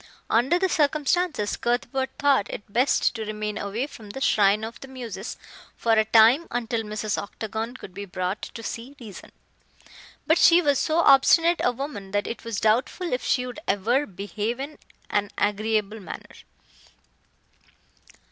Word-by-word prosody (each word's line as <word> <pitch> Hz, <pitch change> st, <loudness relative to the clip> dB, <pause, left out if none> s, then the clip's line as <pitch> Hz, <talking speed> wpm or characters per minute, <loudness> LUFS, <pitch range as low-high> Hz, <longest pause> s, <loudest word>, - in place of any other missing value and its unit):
Under 250 Hz, +9 st, +3 dB
the 380 Hz, +1 st, +1 dB
circumstances 300 Hz, -, +1 dB
Cuthbert 245 Hz, +2 st, -1 dB
thought 280 Hz, -7 st, +2 dB
it -, -, -6 dB
best 255 Hz, +4 st, +2 dB
to 225 Hz, -2 st, -4 dB
remain 210 Hz, 0 st, -4 dB
away 205 Hz, +6 st, -2 dB
from 220 Hz, -7 st, -12 dB
the 235 Hz, -, -6 dB
"Shrine 210 Hz, -4 st, +3 dB
of 225 Hz, +1 st, -6 dB
the 270 Hz, -, -10 dB
Muses" 235 Hz, -6 st, -7 dB, 0.4 s
for 230 Hz, -, 0 dB
a 220 Hz, -1 st, +4 dB
time 230 Hz, +8 st, +5 dB
until 235 Hz, -1 st, -2 dB
Mrs. 215 Hz, -1 st, -3 dB
Octagon 220 Hz, +4 st, -5 dB
could 185 Hz, -, -11 dB
be 200 Hz, +2 st, -6 dB
brought 185 Hz, +1 st, -3 dB
to 230 Hz, -, -8 dB
see 240 Hz, +5 st, -6 dB
reason. 215 Hz, -6 st, -11 dB, 0.9 s
But 320 Hz, +2 st, +3 dB
she 340 Hz, +1 st, +7 dB
was 285 Hz, -6 st, +2 dB
so 315 Hz, -, 0 dB
obstinate 330 Hz, +5 st, +5 dB
a 245 Hz, -, +3 dB
woman 245 Hz, -6 st, -6 dB
that 205 Hz, 0 st, +1 dB
it 230 Hz, -, -6 dB
was 230 Hz, -3 st, -3 dB
doubtful 250 Hz, +10 st, +1 dB
if 250 Hz, -, -1 dB
she 250 Hz, -1 st, +1 dB
would 250 Hz, +4 st, -7 dB
ever 235 Hz, +9 st, +1 dB
behave 205 Hz, +5 st, -4 dB
in 285 Hz, +3 st, -6 dB, 0.3 s
an 205 Hz, 0 st, +1 dB
agreeable 215 Hz, +1 st, 0 dB
manner. 195 Hz, -, -9 dB
230 Hz, 155 wpm, -25 LUFS, 210-270 Hz, 0.9 s, she